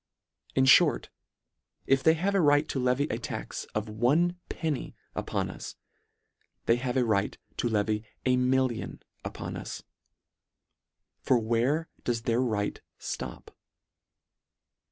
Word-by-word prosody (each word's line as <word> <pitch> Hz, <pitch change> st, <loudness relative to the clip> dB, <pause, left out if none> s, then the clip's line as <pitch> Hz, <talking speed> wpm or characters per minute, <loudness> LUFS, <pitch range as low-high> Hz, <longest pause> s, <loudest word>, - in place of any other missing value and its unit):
In 130 Hz, -, +4 dB
fhort, 130 Hz, -, +5 dB, 0.8 s
if 135 Hz, 0 st, +3 dB
they 160 Hz, +3 st, +5 dB
have 190 Hz, +5 st, 0 dB
a 195 Hz, -, +4 dB
right 145 Hz, -1 st, +4 dB
to 135 Hz, -, -1 dB
levy 125 Hz, +2 st, +2 dB
a -, -, -2 dB
tax -, -, -5 dB
of 105 Hz, +1 st, -1 dB
one 140 Hz, +12 st, +2 dB
penny 155 Hz, -4 st, -3 dB, 0.2 s
upon -, -, -2 dB
us, -, -, -8 dB, 0.9 s
they 115 Hz, -, +4 dB
have 125 Hz, +1 st, -2 dB
a 125 Hz, -, +3 dB
right 105 Hz, -3 st, +1 dB, 0.2 s
to 120 Hz, -, 0 dB
levy 105 Hz, 0 st, +1 dB, 0.2 s
a 130 Hz, -1 st, +4 dB
million 125 Hz, -1 st, 0 dB, 0.2 s
upon -, -, -5 dB
us. -, -, -6 dB, 1.4 s
For 130 Hz, -, +3 dB
where 120 Hz, +8 st, +1 dB, 0.2 s
does 115 Hz, -2 st, -1 dB
their 120 Hz, +1 st, +2 dB
right 105 Hz, -5 st, -1 dB, 0.2 s
ftop -, -, -6 dB
125 Hz, 130 wpm, -29 LUFS, 115-140 Hz, 1.4 s, fhort